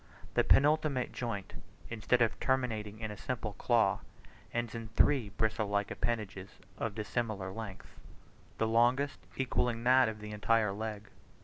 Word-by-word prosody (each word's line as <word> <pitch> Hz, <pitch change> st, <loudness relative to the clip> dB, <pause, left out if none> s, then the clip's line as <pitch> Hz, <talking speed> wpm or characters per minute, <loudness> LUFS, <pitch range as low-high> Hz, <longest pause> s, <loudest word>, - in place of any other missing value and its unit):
The -, -, +4 dB
penultimate 150 Hz, -3 st, +3 dB
joint, 115 Hz, -6 st, -4 dB, 0.4 s
instead 120 Hz, +2 st, +2 dB
of 115 Hz, -, -1 dB
terminating 110 Hz, -6 st, -1 dB
in 110 Hz, -1 st, -3 dB
a -, -, -6 dB
simple 115 Hz, -4 st, -3 dB
claw, 115 Hz, -6 st, +3 dB, 0.5 s
ends 120 Hz, -1 st, -2 dB
in 115 Hz, -1 st, -5 dB
three 115 Hz, +1 st, +3 dB
bristle 110 Hz, 0 st, 0 dB
like 100 Hz, 0 st, 0 dB
appendages 105 Hz, -5 st, -3 dB, 0.3 s
of 110 Hz, -3 st, -2 dB
dissimilar 110 Hz, -3 st, -2 dB
lengths 100 Hz, -2 st, -8 dB, 0.6 s
the 110 Hz, -, +1 dB
longest 120 Hz, +5 st, +2 dB, 0.2 s
equalling 125 Hz, -3 st, 0 dB
that 130 Hz, -1 st, +5 dB
of 110 Hz, -1 st, -7 dB
the 105 Hz, 0 st, -7 dB
entire 105 Hz, 0 st, +2 dB
leg. 105 Hz, 0 st, -5 dB
115 Hz, 140 wpm, -32 LUFS, 105-120 Hz, 0.6 s, that